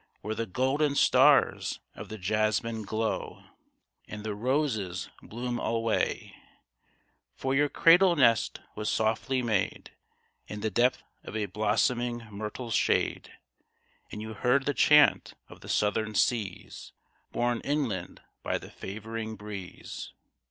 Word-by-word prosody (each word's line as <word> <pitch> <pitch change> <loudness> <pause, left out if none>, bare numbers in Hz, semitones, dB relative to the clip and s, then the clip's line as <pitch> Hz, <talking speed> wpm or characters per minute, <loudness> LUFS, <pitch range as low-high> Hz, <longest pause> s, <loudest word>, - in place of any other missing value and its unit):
Where 110 +2 -3
the 115 +1 -3
golden 140 +7 +1
stars - - +4
of - - -9
the 110 - -6
jasmine 110 +3 0
glow. 110 +2 -3 0.6
And 105 -1 -7
the 110 -1 -3
roses 110 -6 -1
bloom 120 +1 -4
alway! 115 -1 -1 1.0
For 130 0 -2
your 145 +2 +3
cradle 175 +4 +6
nest 120 -6 +3
was 105 0 -2
softly 115 +4 0
made 110 -5 -1 0.6
In 105 0 -6
the 110 0 -1
depth 120 +6 +2 0.2
of - - -8
a 110 -1 0
blossoming 115 +4 0
myrtle's 110 +3 -5
shade; - - +1 0.8
And 105 - -6
you 110 0 -6
heard 125 +5 +2
the 145 - +1
chant 150 +1 +5
of - - -14
the - - -11
southern 105 +1 0
seas 105 -7 -1 0.4
Borne 120 0 0
inland 130 -12 -2 0.2
by - - -1
the - - -11
favoring 110 +2 -6
breeze. 100 -3 -8
110 Hz, 125 wpm, -28 LUFS, 105-125 Hz, 1.0 s, cradle